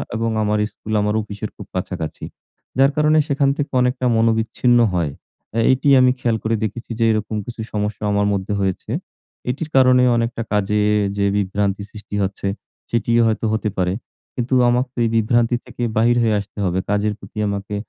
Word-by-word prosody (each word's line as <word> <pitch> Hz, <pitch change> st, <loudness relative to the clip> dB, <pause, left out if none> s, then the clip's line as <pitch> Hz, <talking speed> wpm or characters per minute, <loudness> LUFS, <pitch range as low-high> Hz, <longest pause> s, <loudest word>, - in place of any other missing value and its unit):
এবং 115 Hz, +1 st, 0 dB
আমার 105 Hz, 0 st, +1 dB
স্কুল 110 Hz, -, -7 dB
আমার 105 Hz, +1 st, 0 dB
অফিসের 105 Hz, 0 st, -6 dB
খুব 100 Hz, -, -9 dB
কাছাকাছি 90 Hz, -3 st, -4 dB, 0.5 s
যার 135 Hz, +1 st, +5 dB
কারণে 150 Hz, +1 st, +3 dB
সেখান 140 Hz, -1 st, +2 dB
থেকে 145 Hz, -, -2 dB
অনেকটা 125 Hz, 0 st, 0 dB
মনোবিচ্ছিন্ন 115 Hz, +2 st, +2 dB
হয়। 85 Hz, -5 st, 0 dB, 0.5 s
এ 115 Hz, -, +3 dB
এটিই 135 Hz, +2 st, +3 dB
আমি 125 Hz, 0 st, +5 dB
খেয়াল 115 Hz, -3 st, +1 dB
করে 110 Hz, +1 st, +1 dB
দেখেছি 115 Hz, +3 st, -5 dB
যে -, -, +2 dB
এরকম 110 Hz, 0 st, -2 dB
কিছু 120 Hz, -2 st, -7 dB
সমস্যা 105 Hz, 0 st, -2 dB
আমার 100 Hz, 0 st, +2 dB
মধ্যে 100 Hz, +1 st, -2 dB
হয়েছে। 95 Hz, -1 st, -2 dB, 0.6 s
এটির 150 Hz, +5 st, -3 dB
কারণে 125 Hz, -1 st, +6 dB
অনেকটা 115 Hz, 0 st, -1 dB
কাজে 105 Hz, +1 st, +1 dB, 0.4 s
যে 100 Hz, -, +2 dB
বিভ্রান্তি 100 Hz, 0 st, 0 dB
সৃষ্টি 105 Hz, -1 st, -8 dB
হচ্ছে 95 Hz, +1 st, -3 dB, 0.4 s
সেটিও 115 Hz, 0 st, +2 dB
হয়তো 110 Hz, +1 st, 0 dB
হতে 110 Hz, 0 st, 0 dB
পারে, 90 Hz, 0 st, +1 dB, 0.4 s
কিন্তু 125 Hz, +1 st, -2 dB, 0.2 s
আমাকে 125 Hz, +2 st, +1 dB
তো -, -, -6 dB
এই -, -, +1 dB
বিভ্রান্তি 115 Hz, +2 st, +2 dB
থেকে 120 Hz, -, -6 dB
বাহির 120 Hz, +2 st, +4 dB
হয়ে 110 Hz, -2 st, +2 dB
আসতে 100 Hz, +2 st, -10 dB
হবে। 90 Hz, +1 st, 0 dB
কাজের 105 Hz, +1 st, +1 dB
প্রতি -, -, -14 dB
আমাকে 100 Hz, 0 st, -4 dB
110 Hz, 175 wpm, -20 LUFS, 105-120 Hz, 0.6 s, কারণে